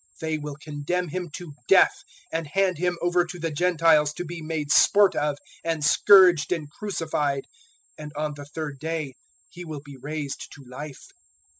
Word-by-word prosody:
They 160 -1 -2
will 150 -1 -6
condemn 150 +4 -3
Him 180 +1 -4
to 170 -4 -8
death, - - +5 0.3
020:019 - - +2
and 165 - -8
hand 185 +3 +1
Him 180 0 0
over 175 0 +3
to 180 +1 -8
the 165 -1 -3
Gentiles 160 -2 +3
to 175 - -5
be 170 0 -7
made 155 -2 -3
sport 200 +5 +5
of 150 -1 0 0.3
and 165 -3 -1
scourged 185 -2 +6
and 165 -4 -1
crucified; 155 -8 -2 0.5
and 150 -1 -7
on 150 0 -2
the 145 0 -9
third 145 -2 -6
day 160 -3 -3 0.4
He 180 - -9
will 155 -4 -7
be 140 -2 -11
raised 145 +1 -5
to 145 - -13
life." 135 +3 -9
155 Hz, 175 wpm, -25 LUFS, 145-175 Hz, 0.5 s, scourged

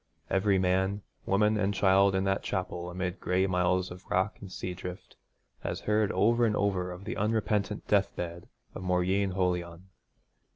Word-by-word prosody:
Every 95 0 +3
man, 95 +2 +1 0.2
woman, 105 +2 +3
and 100 -1 0
child 95 +1 +4
in 95 - +1
that 95 0 +1
chapel 90 -2 -3
amid 90 +1 -3
gray 90 +1 +1
miles 90 0 +1
of 90 +1 -9
rock 95 +3 +1
and 95 -2 -9
sea 90 0 -4
drift, 90 0 -8 0.4
has - - -4
heard 105 -1 +1
over 115 +5 +3
and 110 -2 +3
over 95 -3 0
of 90 +2 -8
the - - -3
unrepentant 105 -1 0
deathbed 90 -4 -1 0.2
of - - -7
Mauryeen 95 +2 +1
Holion. 90 -1 -2
95 Hz, 160 wpm, -29 LUFS, 90-100 Hz, 0.4 s, child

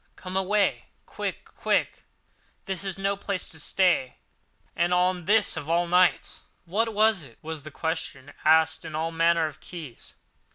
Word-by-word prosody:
Come 185 0 -8
away 195 +2 +1 0.2
quick—quick! - - -2 0.6
This 190 -2 -3
is 195 -2 -4
no 195 +1 0
place 200 -1 -3
to 160 - -3
stay, 170 -5 +2 0.6
and 175 +1 +2
on 180 -1 +1
this 210 +1 +3
of 145 - -6
all 170 +1 +2
nights!" 180 +1 +2 0.2
"What 220 +5 -1
was 215 -2 +4
it?" 125 -6 -13
was 160 -1 -5
the 155 - -9
question, 145 -3 -4
asked 160 +1 +4
in 155 - -7
all 160 +1 -1
manner 165 0 +3
of 155 0 -6
keys. 160 -9 -10
175 Hz, 155 wpm, -26 LUFS, 160-190 Hz, 0.6 s, was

